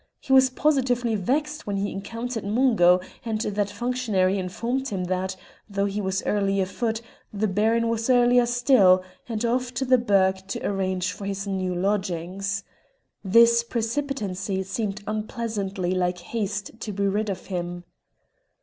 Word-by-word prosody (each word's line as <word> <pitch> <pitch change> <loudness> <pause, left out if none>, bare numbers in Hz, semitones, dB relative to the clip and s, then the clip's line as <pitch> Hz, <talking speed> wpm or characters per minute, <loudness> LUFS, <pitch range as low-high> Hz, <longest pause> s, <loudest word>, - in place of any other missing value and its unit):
He 265 - -1
was 265 0 +7
positively 255 -4 +1
vexed 295 - -1
when 200 -1 -1
he 200 +1 -1
encountered 230 +4 -5
Mungo, 200 -5 +4 0.2
and 225 -2 -2
that 205 -2 -1
functionary 205 -4 0
informed 235 +9 -2
him 195 -7 -3
that, 185 +1 -2 0.3
though 200 0 0
he 200 +1 -2
was 190 0 -1
early 195 -1 +1
afoot, 225 +4 -1 0.3
the 210 +1 0
Baron 220 +4 +2
was 230 +1 -1
earlier 245 -1 +5
still, 240 -7 +5 0.3
and 225 0 -2
off 250 +1 0
to 265 - -1
the 255 0 +4
burgh 190 -4 +2
to - - -4
arrange 185 -2 -1
for 200 +2 -8
his 195 0 -3
new 185 -2 -2
lodgings. 195 0 -1 0.6
This 235 +4 +5
precipitancy 225 -6 -2
seemed 205 +1 -3
unpleasantly 215 -4 -2
like 180 -1 0
haste 205 +2 -3
to 220 - -4
be 200 0 0
rid 210 +2 0
of 190 -2 -5
him. 175 -2 -4
205 Hz, 150 wpm, -25 LUFS, 190-235 Hz, 0.6 s, was